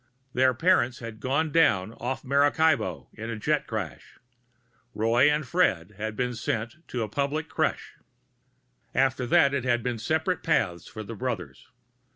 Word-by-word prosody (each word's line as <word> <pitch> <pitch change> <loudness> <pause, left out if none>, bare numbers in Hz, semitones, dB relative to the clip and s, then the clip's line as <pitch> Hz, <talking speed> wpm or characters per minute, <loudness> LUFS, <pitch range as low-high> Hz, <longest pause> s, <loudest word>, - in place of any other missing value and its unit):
Their 130 0 +3
parents 130 -5 +3
had 115 -4 -8
gone 140 +7 0
down 110 - +3
off 125 +3 -4
Maracaibo 145 +2 +2
in 115 +1 -7
a 115 - -3
jet 150 +7 0
crash; 95 - -6 0.8
Roy 115 +6 +4
and 150 0 0
Fred 105 - +1
had 110 +2 -4
been 125 +1 -1
sent 115 +3 -3
to - - -6
the 115 -2 0
public 145 +7 -2
crèche. - - -2 1.0
After 130 -1 +2
that 140 +3 +4
it 135 -3 0
had 120 -2 +1
been 120 -2 -2
separate 160 - 0
paths 95 - 0
for 110 - -7
the 115 - -7
brothers. 100 - -5
125 Hz, 155 wpm, -27 LUFS, 110-145 Hz, 1.0 s, Roy